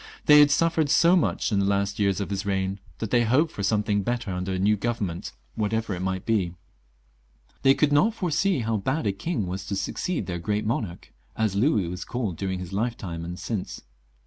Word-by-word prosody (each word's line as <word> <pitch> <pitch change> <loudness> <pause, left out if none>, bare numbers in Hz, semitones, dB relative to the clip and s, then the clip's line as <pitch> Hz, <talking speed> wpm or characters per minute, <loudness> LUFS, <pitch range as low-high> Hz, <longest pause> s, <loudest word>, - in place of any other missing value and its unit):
They 150 0 +8
had 145 0 +7
suffered 160 0 +2
so 170 +4 +5
much 175 - +1
in 100 - +2
the 100 - +2
last 100 +1 0
years 100 -2 +2
of 100 0 -3
his 100 -1 -2
reign, 95 0 -1 0.2
that 110 - -4
they 120 -1 +4
hoped 130 +8 +2
for - - -6
something 105 0 +1
better 120 -1 -2
under 90 +1 -3
a - - -1
new 100 +3 +3
Government, 100 -5 -3 0.2
whatever 110 0 -1
it 90 - -4
might 95 0 -2
be. 95 -6 0 1.1
They 135 0 +5
could 150 -1 +2
not 215 +10 +3
foresee 180 - +1
how 115 -1 0
bad 130 +8 -1
a 100 - +2
king 110 - -3
was 90 +1 -4
to 100 - -2
succeed 175 - -2
their 85 -2 -4
Great 105 +4 -1
Monarch, 110 - -3 0.2
as 110 -3 0
Louis 105 - +2
was 90 +2 -5
called 115 -8 -3
during 95 +1 -3
his 90 0 -7
lifetime 100 -6 -3
and 90 +1 -6
since. 105 -3 -5
105 Hz, 205 wpm, -25 LUFS, 95-125 Hz, 1.1 s, They